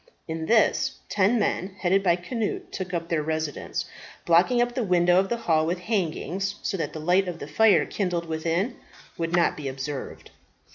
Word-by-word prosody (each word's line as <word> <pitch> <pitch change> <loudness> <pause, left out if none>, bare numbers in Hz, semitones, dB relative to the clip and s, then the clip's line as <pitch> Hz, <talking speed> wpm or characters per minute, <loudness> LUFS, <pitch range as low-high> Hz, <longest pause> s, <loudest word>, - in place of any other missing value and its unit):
In 160 -1 -4
this, 225 -1 +3
ten 205 +4 +3
men, 195 -3 -1
headed 190 +2 +2
by 175 -3 +3
Cnut, 210 +5 -4
took 185 -1 -5
up 170 -2 -3
their 165 -2 +1
residence, 155 -1 -3 0.4
blocking 175 +9 +4
up 240 0 +1
the 245 - -1
window 180 -2 +4
of 195 - 0
the 235 - 0
hall 160 -8 +1
with 175 +2 0
hangings, 195 0 -2
so - - -1
that 155 -5 -3
the 155 - -6
light 180 +4 +2
of 175 -2 -4
the - - -7
fire 200 +5 +4
kindled 180 -4 -2
within 165 +8 -1 0.4
would 165 +1 0
not 175 - +3
be 145 -3 -6
observed. 135 +1 -6
175 Hz, 185 wpm, -25 LUFS, 160-195 Hz, 0.4 s, blocking